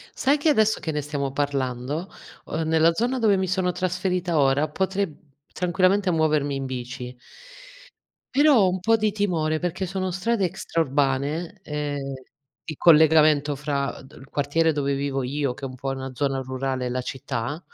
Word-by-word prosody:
Sai 280 +3 +2
che 305 +2 +1
adesso 220 -6 +3
che 160 - -3
ne 150 0 -2
stiamo 140 -2 -3
parlando, 140 +3 -2 0.4
uhm, 160 +1 -3
nella 160 +1 +4
zona 245 +6 0
dove 210 -4 +3
mi 190 0 -1
sono 185 -1 0
trasferita 180 -2 -1
ora, 140 +2 +3
potrei, 190 +4 0
mhmm, 150 - -14 0.4
tranquillamente 185 +2 +2
muovermi 155 -3 +1
in 135 0 -3
bici 125 0 -6 1.2
però 285 -1 +5
ho 190 -2 +4
un 185 +1 -2
po' 225 +5 +3
di 215 -1 +1
timore 170 -7 0
perché 180 +2 -3
sono 185 0 -2
strade 200 +2 0
extraurbane 150 +3 -1
e 150 -1 -3 0.7
il 155 - -7
collegamento 155 -2 +5
fra 140 -1 -3
d 135 - -16
il 135 - -14
quartiere 160 +3 +1
dove 140 -2 -1
vivo 135 -1 -2
io, 135 -1 -2
che 135 - -7
è - - -4
po' 135 +2 -5
una 135 0 -4
zona 135 0 -1
rurale 130 0 -3
e - - -2
la 125 +1 -2
città 130 +3 -4
155 Hz, 170 wpm, -24 LUFS, 135-185 Hz, 1.2 s, però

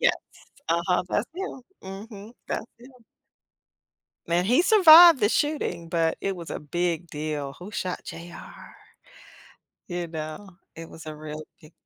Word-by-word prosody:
Yes. - - +4 0.6
Uh-huh, 170 +2 +1
that's 205 - 0
him. 370 -8 -6 0.2
Mhm. 200 +2 -9 0.2
That's - - -3
him. 250 +3 -15 1.4
Man, 170 +2 +1
he 250 - +4
survived 345 -6 +9
the 210 - +3
shooting, 230 - -1
but 165 -1 0
it 195 -1 -2
was 170 -2 -9
a - - -4
big 170 +2 -2
deal. 150 -2 -4
"Who 195 +4 -11
shot 180 -3 -4
J.R.?" 170 +1 -11 1.1
You 175 -1 -4
know, 160 +4 -8 0.2
it 165 0 -9
was 160 - -12
a 155 - -7
real 155 0 -8 0.2
big 155 +1 -16
175 Hz, 140 wpm, -25 LUFS, 160-215 Hz, 1.4 s, survived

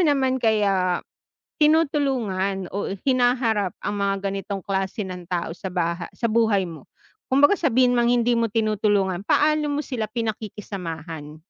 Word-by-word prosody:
naman 270 -5 +2
kaya 200 -5 +1 0.6
tinutulungan 260 - +1
o 200 - -2 0.2
hinaharap 245 -6 +2
ang 205 - -1
mga 200 0 +1 0.2
ganitong 195 -1 -5
klase 195 +2 -2
ng 180 -2 -8
tao 175 -2 -2
sa 185 +3 -6
baha 175 -1 -2
sa - - -7
buhay 220 -4 +3
mo? 165 -6 -10 0.4
Kumbaga 280 +5 +5
sabihin 255 - +3
mang 240 -1 +2
hindi 240 0 +3
mo 230 -1 +1
tinutulungan 205 -4 +1
paano 305 0 +3
mo 290 0 -1
sila 225 -6 -3
pinakikisamahan? 180 -9 -5
210 Hz, 135 wpm, -23 LUFS, 190-250 Hz, 0.6 s, Kumbaga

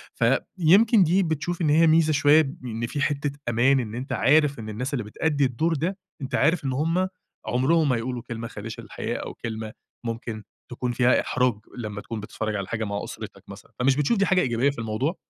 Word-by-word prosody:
فيمكن 195 +5 +4
دي 180 +4 +3
بتشوف 170 +2 -2
إن 155 - +2
هي 160 +3 +5
ميزة 160 0 +4
شوية، 145 +2 +5 0.2
إن 115 -1 -3
في 145 - -3
حتّة 145 0 0 0.2
أمان 130 +4 +3
إن 110 -3 -4
أنتَ 125 +3 -6
عارِف 150 -1 +3
إن 110 -1 -6
الناس 125 +7 -4
اللي 120 -6 -1
بتأدِّي 145 +6 0
الدور 145 +7 0
ده، 170 +6 -2 0.2
أنتَ 130 -1 -3
عارِف 155 +3 +2
إن 135 - 0
هُم 165 +7 +1 0.4
عُمرهم 145 +5 +2
ما 125 - +3
هيقولوا 120 +1 -3
كلمة 115 0 -5
خادشة 115 0 -7
للحياء - - -4
أو - - -6
كلمة 110 -1 -6 0.3
ممكن 115 -2 -5 0.3
تكون 120 0 -2
فيها 125 +1 +3
إحراج، 125 -2 +1 0.2
لمّا 105 -3 -5
تكون 115 0 -6
بتتفرَّج 105 +1 -4
على 100 -2 -3
حاجة 115 0 -3
مع 100 -1 -3
أسرتك - - -8
مثلًا. - - -12
فمش 130 +2 +3
بتشوف 150 - +1
دي 200 - +3
حاجة 185 -1 +3
إيجابية 125 -1 +1
في 140 - -9
الموضوع؟ 115 - -1
130 Hz, 200 wpm, -25 LUFS, 115-160 Hz, 0.4 s, هي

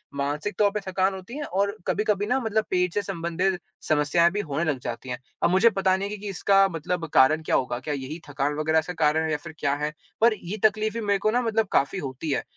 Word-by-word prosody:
मानसिक 145 +8 -2
तौर 205 -1 +5
पे 210 - -2
थकान 190 +1 +1
होती 190 +8 -8
है 295 - -3
और 200 -2 -1
कभी-कभी 210 -1 +1
ना 255 +3 +2
मतलब 220 -3 0
पेट 180 -1 +1
से 205 - +1
संबंधित 180 0 -1 0.3
समस्याएँ 155 +3 +3
भी 205 - -2
होने 150 -3 -2
लग 140 - -3
जाती 120 +2 -6
हैं। 125 -1 -4 0.2
अब - - +5
मुझे 190 +6 +5
पता 190 -3 +2
नहीं 200 +1 -3
कि 210 - -5
कि 205 0 -6
इसका 195 +1 +4
मतलब 165 +1 -3
कारण 155 +4 +5
क्या - - +1
होगा, 125 -1 0
क्या 150 +2 -4
यही 140 +4 -5
थकान 145 +1 -1
वग़ैरह 160 +1 +3
का 180 - -3
कारण 155 +2 +3
है 160 - -1
या 150 - +1
फिर 155 +2 -10
क्या 140 -1 +1
है? 150 +1 -3 0.3
पर 230 0 +6
ये 200 0 -6
तकलीफ़ें 215 +1 +2
मेरे 200 -2 +1
को 215 +2 +1
ना 245 - +2
मतलब 225 -3 +1
काफ़ी 140 +8 +1
होती 140 +3 -4
है। - - 0
180 Hz, 245 wpm, -25 LUFS, 150-205 Hz, 0.3 s, पर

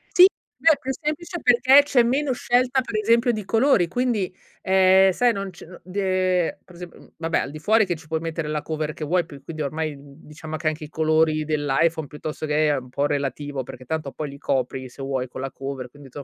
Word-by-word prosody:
Sì, 360 - +10
è 330 -4 +1
più 265 -1 -4
semplice 310 +5 -4
perché 260 +3 +6
c'è 260 -4 +3
meno 265 +3 +1
scelta, 250 +2 +1
per 240 - -7
esempio 235 +3 +3
di 215 -2 -4
colori. 225 -6 +3
Quindi, 225 -2 -1 0.3
ehm, 190 0 +5
sai 240 +4 +2
non 195 -1 -4
c 180 - -13 0.2
d 185 +2 -13
ehm, 185 -3 +1
per 180 - -17
esemp 175 0 -10
mhmm, - - -17
vabbè, 165 0 0
al - - -3
di 155 - -8
fuori, 215 +3 +3
ci 165 -3 -4
puoi 160 0 -1
mettere 165 -1 -4
la 150 -1 -2
cover 155 -1 -3
che 155 - -7
vuoi 175 +3 +1
più 140 -4 -12
quindi 155 0 -5
ormai, 155 +1 -3
mhmm, 140 0 -15
diciamo 155 +1 -8
che 155 - -3
anche 155 0 -2
i 150 - -8
colori 155 0 +2
dell'iPhone, 155 +2 +1
piuttosto 155 +2 -6
che 150 +1 +2
è 145 - +2
un 130 -1 -8
po' 140 +3 0
relativo, 140 -1 -3
perché 130 +1 -11
tanto 155 -1 -3
poi 150 -2 -5
li 140 - -10
copri 130 -1 -2
se 125 - -12
vuoi 135 -1 -2
con 130 - -8
la 135 - -3
cover 135 -2 -6
quindi 140 +1 -15
160 Hz, 220 wpm, -23 LUFS, 145-215 Hz, 0.3 s, Sì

